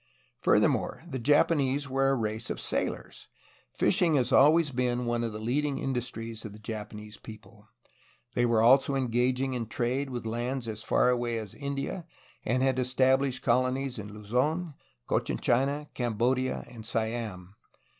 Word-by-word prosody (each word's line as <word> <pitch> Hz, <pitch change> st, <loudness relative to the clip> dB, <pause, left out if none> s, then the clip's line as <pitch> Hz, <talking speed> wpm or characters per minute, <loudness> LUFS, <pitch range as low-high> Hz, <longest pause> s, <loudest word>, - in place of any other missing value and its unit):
Furthermore, -, -, +2 dB
the 135 Hz, -6 st, -4 dB
Japanese 145 Hz, +1 st, +2 dB
were 135 Hz, +1 st, +2 dB
a 135 Hz, -, +3 dB
race 110 Hz, -1 st, -2 dB
of -, -, -3 dB
sailors. -, -, -3 dB, 0.4 s
Fishing 165 Hz, -, +2 dB
has 125 Hz, -3 st, +1 dB
always 150 Hz, +2 st, +5 dB
been 125 Hz, -1 st, 0 dB
one 120 Hz, 0 st, 0 dB
of 115 Hz, -, -2 dB
the 105 Hz, -, -6 dB
leading 135 Hz, +6 st, -1 dB
industries 115 Hz, -3 st, -3 dB
of 105 Hz, -, -7 dB
the -, -, -11 dB
Japanese 105 Hz, -1 st, -7 dB
people. 110 Hz, -1 st, -13 dB, 0.7 s
They 120 Hz, -, +1 dB
were 115 Hz, -2 st, +3 dB
also 135 Hz, +3 st, +5 dB
engaging 130 Hz, +1 st, +1 dB
in 120 Hz, -3 st, -3 dB
trade 125 Hz, +5 st, -1 dB
with 120 Hz, -3 st, -5 dB
lands 120 Hz, +2 st, -2 dB
as 110 Hz, -1 st, -4 dB
far 110 Hz, +2 st, +3 dB
away 120 Hz, -1 st, -1 dB
as 110 Hz, -4 st, -6 dB
India, 140 Hz, +4 st, -4 dB, 0.4 s
and 125 Hz, +3 st, +1 dB
had 130 Hz, -1 st, +2 dB
established 130 Hz, +1 st, +2 dB
colonies 130 Hz, +1 st, +1 dB
in 105 Hz, 0 st, -7 dB
Luz6n, 125 Hz, -, -1 dB, 0.3 s
Cochin -, -, 0 dB
China, 140 Hz, +5 st, +1 dB
Cam 120 Hz, -3 st, -2 dB
bodia, 130 Hz, +3 st, 0 dB
and 115 Hz, -2 st, -10 dB
Siam. 110 Hz, -5 st, -3 dB
125 Hz, 155 wpm, -29 LUFS, 115-135 Hz, 0.7 s, always